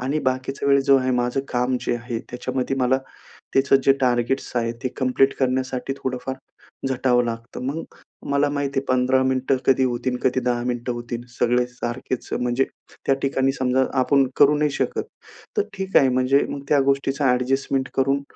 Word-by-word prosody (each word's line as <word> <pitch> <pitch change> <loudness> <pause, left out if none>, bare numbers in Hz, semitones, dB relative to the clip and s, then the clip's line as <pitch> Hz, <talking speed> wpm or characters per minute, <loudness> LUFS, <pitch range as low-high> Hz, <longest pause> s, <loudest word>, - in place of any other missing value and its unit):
आणि 135 +5 -1
बाकीचा 130 +2 -1
वेळ 140 0 +5
जो 135 0 +5
आहे, 130 0 0
माझं 125 +2 0
काम 125 +1 0
जे - - -1
आहे 120 -1 -4
त्याच्यामध्ये 130 +2 -2
मला, 130 +1 +3 0.6
त्याचं 135 0 +5
जे 135 - +6
टार्गेट्स 125 +1 0
आहेत 115 0 0
ते 130 - 0
कंप्लीट 135 +1 +2
करण्यासाठी 130 0 -1
थोडंफार 130 0 -4 0.5
झटावं 125 -2 +2
लागतं. 115 +1 -5
मग 155 +4 -2 0.5
मला 140 +1 +3
माहिती 140 -1 -1
आहे 135 - -1
15 130 +1 +3
मिनिटं 130 0 +1
कधी 130 0 +4
होतील 125 0 -1
कधी 130 0 +2
10 120 -1 0
मिनिटं 120 0 -2
होतील 120 0 -5
सगळे 120 +1 +1
सारखेच. 125 0 -5
अ, - - +1
म्हणजे 125 +2 +1 0.4
त्या 135 - +4
ठिकाणी 135 -1 +1
समजा 130 0 +1 0.2
आपण 135 +1 +3
करू 145 +1 +5
नाही 150 -1 +2
शकत, - - -1 0.5
तर 420 - +3
ठीक 190 0 -2
आहे 135 - +4
म्हणजे 130 +2 +3
मग 140 - -5
त्या 145 -2 +4
गोष्टीचा 135 -1 +1
एडजस्टमेंट 135 +1 0
करून 135 +1 +1
130 Hz, 175 wpm, -23 LUFS, 125-135 Hz, 0.6 s, जे